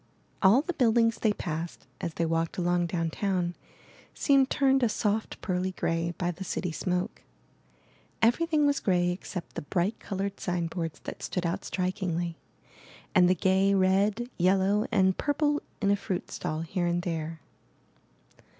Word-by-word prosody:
All 215 +8 +6
the 355 - -3
buildings 230 -3 +3
they 220 - +3
passed, 170 -4 -5 0.2
as 170 - -3
they 170 - 0
walked 165 0 -1
along 175 -1 +1
downtown, 175 +1 -1 0.6
seemed 275 -1 +4
turned 270 -1 +3
a 240 - +3
soft 215 0 -1
pearly 185 -1 -1
gray 165 -1 -1
by 175 -1 0
the 180 +3 -7
city 180 -1 -2
smoke; 180 +5 -2 1.0
everything 300 +6 +3
was 285 -1 +2
gray 180 -2 +2
except 180 0 -6
the 170 - -4
bright 175 +7 -1
colored 195 0 -4
sign 175 -2 -1
boards 165 -2 -4
that - - -7
stood 180 -1 -2
out 175 +4 -1
strikingly, 180 -2 -2 0.8
and 180 -3 +6
the 185 - +4
gay 190 +2 +3
red, 195 +5 +2
yellow, 195 +5 +3
and 190 -4 +3
purple 290 0 +1 0.2
in 200 - +4
a - - +5
fruit 195 -2 -4
stall 155 +1 -3
here 175 +2 -1
and 175 0 0
there. 165 -2 -3
185 Hz, 150 wpm, -28 LUFS, 175-210 Hz, 1.0 s, All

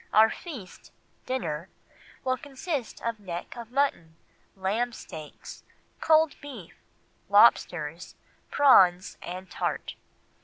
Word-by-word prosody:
Our 220 +1 +6
feast 265 - -9 0.4
[dinner] 170 -10 -3 0.5
will 255 0 +1
consist 275 0 -5
of 230 -2 -2
neck 175 -4 -6
of 235 -2 -8
mutton, 250 - 0 0.4
lamb 215 +6 -1
steaks, 155 -8 -10 0.4
cold 315 -1 +4
beef, 250 - -9 0.6
lobsters, 175 -6 +3 0.3
prawns, 190 -10 +5
and 185 +2 -7
tart." - - -3
220 Hz, 100 wpm, -27 LUFS, 180-260 Hz, 0.6 s, Our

